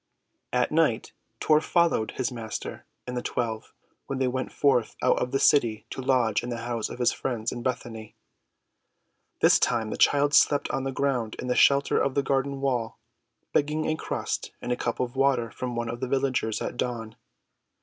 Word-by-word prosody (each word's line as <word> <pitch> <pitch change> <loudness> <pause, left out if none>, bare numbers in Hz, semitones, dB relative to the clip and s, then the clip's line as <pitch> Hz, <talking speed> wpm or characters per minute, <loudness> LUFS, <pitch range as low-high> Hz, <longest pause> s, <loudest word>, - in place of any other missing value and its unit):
At - - +1
night - - +1 0.3
Tor 155 -1 +4
followed 170 -10 +1
his 130 0 -1
Master 115 -3 -6 0.2
and 125 - -5
the 125 - -1
twelve 115 -3 -3 0.4
when 135 - -3
they 130 -1 +1
went 130 +1 -3
forth 130 -5 +1
out 125 - +3
of 125 - -1
the 135 - 0
city 115 -8 +3
to - - -5
lodge 125 -5 +2
in 120 - -6
the 115 -1 -4
house 120 -2 -2
of - - -7
his 125 -1 +3
friends 115 -3 -3
in 120 - -5
Bethany. 115 -3 -4 1.3
This - - +6
time 115 -3 0
the - - -4
child 145 0 +3
slept 145 -1 +4
on 135 - -2
the 135 - -1
ground 130 -5 -1
in 125 - -5
the 125 - +1
shelter 140 0 +4
of 135 - 0
the 140 - +2
garden 135 0 -1
wall, 125 -5 -1 0.6
begging 150 +2 +1
a 155 - 0
crust - - -3
and 125 - -4
a - - +2
cup 120 -1 -3
of 125 0 -2
water 130 -4 +2
from 125 -1 -5
one 120 0 -2
of 120 +1 -5
the 130 - -2
villagers 130 -4 0
at - - -5
dawn. 115 -3 -3
125 Hz, 190 wpm, -26 LUFS, 115-135 Hz, 1.3 s, This